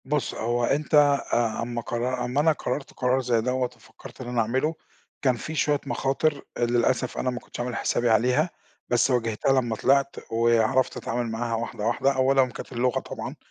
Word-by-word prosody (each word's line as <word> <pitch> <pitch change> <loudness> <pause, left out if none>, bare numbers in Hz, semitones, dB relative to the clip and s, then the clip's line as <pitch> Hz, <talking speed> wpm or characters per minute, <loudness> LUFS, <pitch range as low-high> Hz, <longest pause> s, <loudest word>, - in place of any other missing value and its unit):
بُص 145 +1 -1
هو 120 +2 -1
أنت، 145 +6 0
آآ 140 -6 +3
أما 120 0 -3
قرر 125 +2 -2
أما 125 +3 -1
أنا 160 +1 +4
قررت 140 -2 -4
قرار 130 +1 +1
زي 120 -3 +1
دوَّة 130 +2 0
وفكرت 115 +2 -14
إن 125 - -7
أنا 120 -1 +1
أعمله، 130 +8 0 0.5
كان 130 -3 +3
في 155 +6 -6
شوية 145 -1 +2
مخاطر 140 +2 0 0.2
آآ - - -4
للأسف 120 +1 +1
أنا 130 - 0
ما 125 -1 -3
كنتش - - -11
عامل 120 -1 -2
حسابي 120 +1 0
عليها، 125 +9 +3 0.4
بس 120 +2 +3
واجهتها 125 +2 +2
لمّا 115 -3 -2
طلعت 140 +4 +2 0.2
وعرفت 115 +2 +2
أتعامل 120 -1 -2
معاها 115 +1 -2
واحدة 115 -2 -4
واحدة. 120 +4 +2
أولًا 130 0 +4
كانت - - -9
اللغة 125 0 +1
طبعًا، - - -7
125 Hz, 180 wpm, -25 LUFS, 120-135 Hz, 0.5 s, أنا